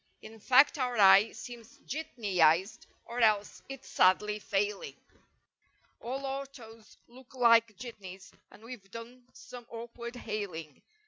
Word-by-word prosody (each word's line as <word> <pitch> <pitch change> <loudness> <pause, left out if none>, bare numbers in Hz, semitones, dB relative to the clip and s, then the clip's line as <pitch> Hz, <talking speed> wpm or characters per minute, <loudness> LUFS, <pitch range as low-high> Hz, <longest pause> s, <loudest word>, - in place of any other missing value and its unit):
In 220 +1 -12
fact 270 +6 +4
our 250 -2 -1
eye 200 +1 +6
seems 230 0 -11
jitneyized 195 - 0 0.2
or 235 +1 -6
else 215 -3 +1
it's 270 -1 -9
sadly 210 +3 +2
failing: 205 0 -2 1.0
All 265 +3 -5
autos 265 -5 -8
look 255 +2 -17
like 230 -4 +4
jitneys, 200 -6 -10 0.2
and 215 - -18
we've 230 -5 -11
done 240 +3 -11
some 245 -1 -12
awkward 235 +1 -8
hailing. 200 - -6
230 Hz, 120 wpm, -30 LUFS, 205-245 Hz, 1.0 s, eye